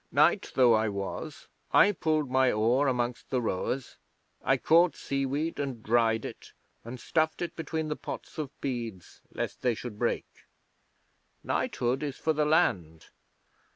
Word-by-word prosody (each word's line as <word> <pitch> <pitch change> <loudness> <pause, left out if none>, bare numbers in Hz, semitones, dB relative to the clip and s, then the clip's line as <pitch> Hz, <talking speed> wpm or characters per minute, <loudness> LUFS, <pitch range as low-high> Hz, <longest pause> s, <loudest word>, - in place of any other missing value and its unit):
Knight - - +3
though 125 -3 +6
I 110 0 +2
was, 100 +10 -5 0.2
I 205 - +6
pulled 155 -5 0
my 130 -1 +4
oar 120 +7 +2
amongst 120 -2 -1
the 130 - +1
rowers. 120 +4 -3 0.5
I 135 +1 +3
caught 165 +5 +4
seaweed 140 +4 -2
and 135 -6 -4
dried 115 0 +2
it, - - -9 0.3
and 120 +2 -8
stuffed 160 +3 0
it 175 - -4
between 160 -1 -3
the 150 - -2
pots - - -8
of 150 -3 -3
beads 115 -9 -5
lest - - -4
they 125 -2 +1
should 115 -2 -8
break. - - 0 1.2
Knighthood 125 +3 -1
is 145 -3 -4
for 160 - 0
the 150 0 +1
land. 90 - +1
130 Hz, 150 wpm, -29 LUFS, 115-155 Hz, 1.2 s, though